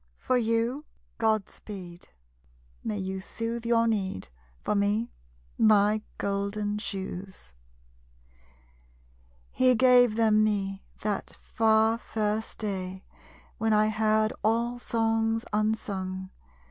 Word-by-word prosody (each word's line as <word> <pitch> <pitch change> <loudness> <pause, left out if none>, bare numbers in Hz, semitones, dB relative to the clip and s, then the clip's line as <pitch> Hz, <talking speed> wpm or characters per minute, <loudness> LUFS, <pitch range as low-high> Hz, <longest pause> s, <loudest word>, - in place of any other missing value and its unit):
For 255 - 0
you, 235 +4 0 0.3
Godspeed! 200 -5 -3 0.7
May 215 -2 -2
you 190 0 -3
soothe 230 +4 -4
your 230 -1 +4
need. 190 - -2 0.3
For - - 0
me, 205 +3 +1 0.5
my 210 0 +4 0.2
golden 200 +1 -2
shoes! 190 - -6 2.0
_He 255 -2 +4
gave 245 -2 +6
them 215 -1 +4
me, 195 -2 -1 0.2
that 205 -2 -3
far, 220 0 +2
first 215 -1 -2
day 190 -3 -4 0.6
When 220 0 +2
I 215 0 +4
heard 215 0 +2
all 235 +2 +1
Songs 225 -1 0
unsung. 195 -3 -2
215 Hz, 95 wpm, -28 LUFS, 200-225 Hz, 2.0 s, gave